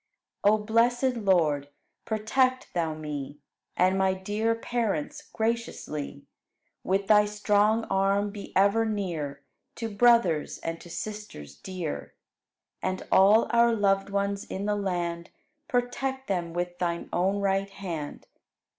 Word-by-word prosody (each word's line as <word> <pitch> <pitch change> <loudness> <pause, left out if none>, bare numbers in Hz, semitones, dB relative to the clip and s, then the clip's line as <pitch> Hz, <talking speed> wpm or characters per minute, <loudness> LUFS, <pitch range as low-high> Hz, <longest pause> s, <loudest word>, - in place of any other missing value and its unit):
13. 205 - +6
O 215 - -4
blessed 240 +4 +2
Lord, 160 -9 +2 0.4
protect 255 +4 0
Thou 165 -3 -1
me 145 -2 -6 0.4
And 185 +1 +3
my 190 0 +2
dear 210 +4 -1
parents 225 -9 -2
graciously; 220 - -3 0.6
With 195 +1 +1
Thy 210 0 +6
strong 210 +1 +2
arm 195 +1 +1
be 205 -1 -9
ever 200 +4 +4
near 170 -10 -3 0.3
To 225 -2 -5
brothers 230 -9 +4
and 165 0 -5
to 175 - -12
sisters 205 - -7
dear. 175 - -6 0.7
And 185 0 -2
all 205 +4 +6
our 235 -1 +4
loved 195 -2 +2
ones 200 0 -1
in 195 +1 -5
the 210 0 +1
land, 175 -4 -2 0.4
Protect 265 0 -1
them 175 -4 -1
with 175 +1 -3
Thine 170 -1 -2
own 190 +3 +1
right 195 0 0
hand. 170 -7 -6
200 Hz, 130 wpm, -27 LUFS, 175-220 Hz, 0.7 s, 13